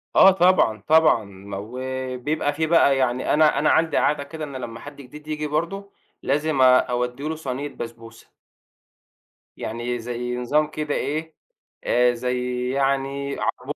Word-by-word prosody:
آه، 190 - +8
طبعًا، 175 - +3
طبعًا، 155 -7 +5
ما 100 0 -9
وبيبقى 130 +6 -3
في 160 +2 -1
بقى 140 -5 +4
يعني 130 -1 0
أنا 155 0 +4
أنا 150 - +2
عندي 160 0 +2
عادة 145 -1 +1
كده 155 +2 -8
إن 140 -3 -7
لمّا 120 -3 -6
حد 145 +3 -10
جديد 150 +3 -13
ييجي 150 0 -3
برضو، 170 +7 -3 0.3
لازم 145 0 0
آآ 130 0 +7
أودّي 125 +2 -2
له 160 - -2
صينية 140 -2 -4
بسبوسة. 115 -3 -10 1.3
يعني 120 +2 -4
زي 125 +1 -4
نظام 150 +5 +1
كده 155 -1 -3
إيه، 155 +2 -3 0.5
آآ 125 0 +3
زي 125 0 -2
يعني 140 +1 -1
عربون 135 +4 -3
135 Hz, 150 wpm, -23 LUFS, 125-150 Hz, 1.3 s, آه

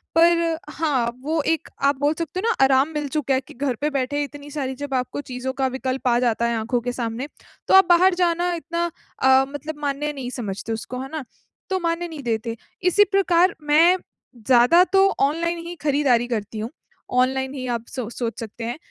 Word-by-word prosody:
पर 335 0 +4
हाँ, 285 -7 0
वो 315 +2 0
एक 325 - -5
आप 280 +1 +4
बोल 290 +2 +2
सकते 335 +2 -3
हो 435 - -1
ना, - - +3
आराम 270 +2 +3
मिल 300 -1 -2
चुका 280 -3 +1
है 260 - +1
कि - - -12
घर 265 0 -2
पे 300 - +1
बैठे 285 0 -1
इतनी 290 0 -9
सारी 270 -3 -3
जब 285 +1 -6
आपको 255 +2 -2
चीज़ों 250 +1 -3
का 265 0 0
विकल्प 260 0 -3
आ 240 -1 +4
जाता 235 -1 +1
है 235 - 0
आँखों 235 +3 0
के 245 +1 -2
सामने, 235 +2 -3 0.4
तो - - +2
आप 385 0 +8
बाहर 360 +2 +6
जाना 350 0 +1
इतना 340 0 -2 0.4
अ, 265 0 +6
मतलब 295 +2 -7
मान्य 290 +1 -2
नहीं 265 -3 -5
समझते 215 -1 -4
उसको, 235 +3 -5
है 265 - -6
ना? 315 -2 -4 0.5
तो 380 -1 0
मान्य 340 0 -1
नहीं 315 -4 -8
देते। 230 -1 -2 0.3
इसी 365 +3 +5
प्रकार 370 -2 +3
मैं 325 +5 +5 0.5
ज़्यादा 255 +8 +6
तो 390 0 +6
ऑनलाइन 335 +5 +1
ही 350 - -6
खरीदारी 275 -5 +2
करती 220 -2 -4
हूँ। 220 +2 -3 0.5
ऑनलाइन 265 +1 0
ही 260 -2 -5
आप 235 -1 -2
सो 250 -4 -5
सोच 235 0 -4
सकते 230 0 -7
हैं। 235 +3 -3
280 Hz, 205 wpm, -23 LUFS, 250-330 Hz, 0.5 s, आप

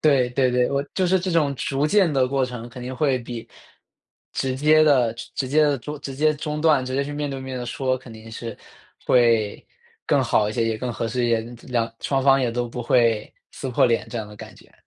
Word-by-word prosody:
对， 135 -5 +3
对 130 +1 +2
对， 125 0 +2
我 140 0 0
就 185 -1 +1
是 185 0 +3
这 185 - -2
种 150 -5 +2
逐 140 +3 0
渐 190 0 +3
的 130 -3 +2
过 135 0 +1
程 125 -2 -6
肯 125 +1 -9
定 130 +1 -5
会 135 -1 +1
比， 120 -1 -8 0.8
直 130 -1 -2
接 155 +2 +5
地 130 -7 +4 0.2
直 130 - -2
接 155 +3 +4
地 145 -3 +1
中 150 +4 -7
直 135 -2 -6
接 155 +2 +2
中 150 +1 -4
断， 150 -5 +3
直 130 - -4
接 140 +1 +1
去 145 - -6
面 145 0 -3
对 135 - -4
面 130 -1 -6
地 120 - -5
说， 130 +1 -1
肯 125 -1 -14
定 110 0 -12
是 115 0 -6 0.5
会 115 -4 +3 0.4
更 - - +3
好 105 - +2
一 105 - -3
些， 115 -1 0
也 110 -1 -1
更 125 0 -3
合 115 - -3
适 120 +1 -1
一 - - 0
些， 115 -1 +2 0.3
2 115 -2 -1
双 135 -1 0
方 135 0 +5
也 125 - +1
都 120 +1 -2
不 125 +1 -5
会 115 -2 +2 0.2
撕 135 - -5
破 125 - +3
脸 115 -2 +1
这 - - -6
样 110 -2 -4
的 105 - -12
感 - - -11
觉。 - - -20
130 Hz, 260 characters per minute, -23 LUFS, 120-145 Hz, 0.8 s, 接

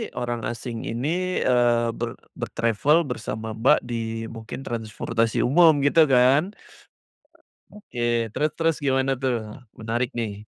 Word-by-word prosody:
orang 120 -1 -3
asing 115 0 -5
ini, 120 +5 -3 0.4
eee, 120 -2 +2
ber 120 0 -3 0.2
ber-travel 125 +9 +1
bersama 110 -2 -5
Mbak 120 +7 +3
di 115 -2 -4
mungkin 115 +3 -8
transportasi 115 -1 -1
umum 160 +6 +6
gitu 155 +2 +5
kan, 135 +9 +3 1.1
oke, 205 -12 -11 0.3
terus 150 +7 0
terus 165 -1 +1
gimana 135 0 +2
tuh? 130 -2 0 0.4
Menarik 115 +3 -1
nih. 105 -3 -4
120 Hz, 120 wpm, -24 LUFS, 115-135 Hz, 1.1 s, umum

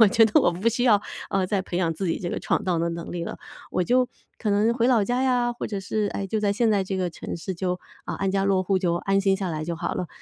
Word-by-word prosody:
我 220 - +8
觉 225 +1 +5
得 215 - +4
我 - - +4
不 190 +7 0
需 245 +2 0
要， 210 -4 +5 0.3
呃， 190 -1 +1
再 195 0 0
培 180 - -5
养 170 -2 +1
自 180 +4 -3
己 165 - 0
这 175 - -4
个 - - -3
闯 - - 0
荡 175 -3 +1
的 170 - +1
能 170 0 -5
力 175 -1 -3
了。 - - -6 0.3
我 180 - 0
就 250 +3 +3 0.3
可 215 - -2
能 210 +3 +3
回 235 0 +2
老 230 -6 +4
家 245 +4 0
呀， 245 -2 +2
或 240 - -5
者 205 -2 -3
是 205 +2 -1
哎， 200 - -2
就 215 +2 -1
在 200 -1 +2
现 225 +1 +2
在 200 -2 +3
这 190 0 -3
个 180 -2 -1
城 - - -6
市 185 +3 -5
就， 180 0 -2 0.3
呃， - - -3
安 195 -1 -1
家 195 0 +1
落 190 -1 +3
户 190 0 +1
就 175 -2 +1
安 195 +2 +1
心 195 -1 +2
下 190 -2 -3
来 155 -1 -3
就 170 0 -3
好 170 +1 -2
了。 180 - -2
195 Hz, 325 characters per minute, -25 LUFS, 180-220 Hz, 0.3 s, 我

